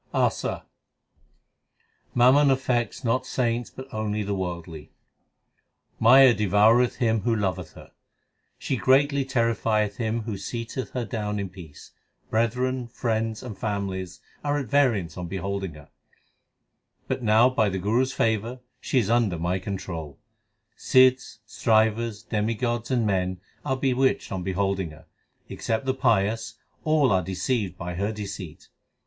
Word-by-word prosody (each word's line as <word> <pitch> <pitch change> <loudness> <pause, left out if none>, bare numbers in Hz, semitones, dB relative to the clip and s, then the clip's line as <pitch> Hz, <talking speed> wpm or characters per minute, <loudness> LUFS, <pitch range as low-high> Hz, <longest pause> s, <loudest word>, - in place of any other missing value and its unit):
ASA - - 0 1.5
Mammon 130 +4 +5
affects 130 -3 0
not 120 +1 +1
saints 120 -1 -1
but 130 +1 -10
only 105 -1 -2
the 100 0 -2
worldly: 85 -4 -5 1.1
Maya 130 +2 +7
devoureth 105 +4 +3
him 115 -2 +1
who 115 +3 +1
loveth 95 -5 -2
her; - - -14 0.7
She 135 - -2
greatly 140 +3 +3
terrifieth 115 -5 0
him 115 -1 -1
who 105 -3 -4
seateth 120 +4 -5
her 125 -2 -2
down 105 -3 -3
in 100 -2 -3
peace. 85 -5 -13 0.4
Brethren, 125 +2 0
friends, 115 -2 -2
and 115 -5 -7
families 95 -3 -4 0.2
are 145 0 0
at 140 - -2
variance 115 - +2
on 90 -1 -4
beholding 95 -1 -4
her; 75 -1 -15 1.2
But - - -2
now 115 +2 +5
by 110 -5 +2
the 95 - -3
Guru 105 +6 +1
s 130 0 -1
favour 115 +2 -1 0.2
she - - -1
is 115 -6 +3
under 115 -6 +2
my 90 +3 -1
control. 90 -7 -6 0.6
Sidhs, 130 -4 +3
Strivers, 110 -1 +1
demigods, 115 +2 -1
and 125 -4 +1
men 95 -2 0 0.2
Are 130 -2 -1
bewitched 130 0 +1
on 95 -2 -3
beholding 95 -1 -1
her; 75 - -15 0.4
except 115 +3 -3
the 130 - +1
pious 115 -3 +1 0.3
all 155 -5 +3
are 95 -1 +3
deceived 95 +1 -2
by 90 0 -5
her 100 +5 -1
deceit. 100 -6 -7
110 Hz, 135 wpm, -25 LUFS, 95-125 Hz, 1.5 s, Maya